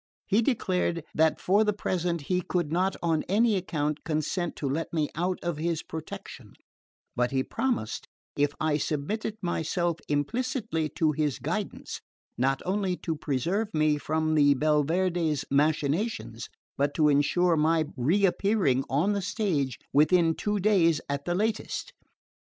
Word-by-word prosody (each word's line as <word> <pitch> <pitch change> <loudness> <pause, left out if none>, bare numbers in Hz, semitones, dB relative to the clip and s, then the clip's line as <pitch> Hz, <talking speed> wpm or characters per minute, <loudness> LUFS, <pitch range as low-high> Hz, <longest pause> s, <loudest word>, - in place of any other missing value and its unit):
He 210 +3 +3
declared 185 - 0
that 160 0 +3
for 200 +4 +3
the 210 -1 +1
present 175 -4 -1
he 180 +5 0
could 175 -3 -2
not 185 +3 +1
on 165 -2 +2
any 220 +2 +3
account 150 -5 -2
consent 165 +3 -2
to 145 - -3
let 150 +5 -2
me 155 -3 0
out 180 +3 -1
of 175 -3 -2
his 165 0 -1
protection; 160 -1 -8 0.6
but 125 0 +1
he 130 0 0
promised 245 - -2 0.3
if 145 0 +1
I 155 -1 +1
submitted 205 +10 -2
myself 175 0 -1
implicitly 185 - -1
to 155 -2 +2
his 150 -2 -1
guidance, - - -4 0.3
not 135 +2 0
only 190 -1 0
to 165 - -3
preserve 165 - -1
me 155 -1 +2
from 155 +1 0
the 145 -2 +5
Belverde's 155 +2 +1
machinations, 150 - 0 0.3
but 145 +1 +1
to 155 -2 +4
ensure 150 +5 +3
my 160 +1 +2
reappearing 180 - +2
on 160 +10 +2
the 200 - -1
stage 185 - -1 0.2
within 165 +3 +4
two 210 +4 -1
days 180 -6 +3
at 140 0 -2
the 175 - 0
latest. 215 +3 -2
165 Hz, 145 wpm, -27 LUFS, 150-185 Hz, 0.6 s, the